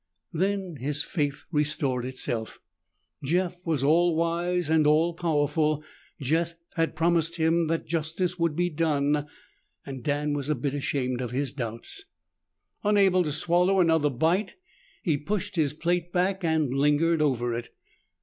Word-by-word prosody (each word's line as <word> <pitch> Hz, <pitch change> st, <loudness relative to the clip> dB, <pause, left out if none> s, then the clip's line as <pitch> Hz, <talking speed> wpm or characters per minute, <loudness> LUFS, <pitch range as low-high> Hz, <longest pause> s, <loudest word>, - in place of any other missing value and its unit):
Then 190 Hz, -1 st, -1 dB
his 145 Hz, +3 st, +1 dB
faith 145 Hz, -6 st, -2 dB
restored 145 Hz, -5 st, +1 dB
itself. 120 Hz, -3 st, -2 dB, 0.6 s
Jeff 180 Hz, +4 st, -1 dB
was 155 Hz, -5 st, 0 dB
all 165 Hz, +3 st, +4 dB
wise 170 Hz, +1 st, 0 dB
and 155 Hz, -1 st, +3 dB
all 160 Hz, +3 st, +3 dB
powerful. 155 Hz, -2 st, 0 dB, 0.4 s
Jeff 165 Hz, +5 st, 0 dB, 0.2 s
had 165 Hz, -3 st, 0 dB
promised 165 Hz, 0 st, +2 dB
him 165 Hz, 0 st, +2 dB
that 165 Hz, +1 st, -1 dB
justice 165 Hz, +3 st, -2 dB
would 165 Hz, -3 st, +1 dB
be 175 Hz, +1 st, 0 dB
done. 150 Hz, -2 st, 0 dB, 0.7 s
Dan 145 Hz, +3 st, -1 dB
was 145 Hz, 0 st, -3 dB
a 150 Hz, -, +2 dB
bit 140 Hz, -2 st, -2 dB
ashamed 130 Hz, -3 st, -1 dB
of 125 Hz, -, -3 dB
his 135 Hz, +2 st, -2 dB
doubts.... 120 Hz, -, -5 dB, 0.8 s
Unable 200 Hz, -3 st, +4 dB
to 155 Hz, -4 st, -1 dB
swallow 180 Hz, +5 st, +2 dB
another 160 Hz, -4 st, +3 dB
bite, 165 Hz, -, 0 dB, 0.5 s
he 160 Hz, -5 st, +1 dB
pushed 205 Hz, +4 st, -3 dB
his 155 Hz, -5 st, +2 dB
plate 175 Hz, +3 st, -1 dB
back 185 Hz, +2 st, 0 dB
and 160 Hz, -5 st, +1 dB
lingered 150 Hz, +4 st, +2 dB
over 120 Hz, -5 st, +1 dB
it. 120 Hz, 0 st, -5 dB
160 Hz, 140 wpm, -26 LUFS, 145-175 Hz, 0.8 s, all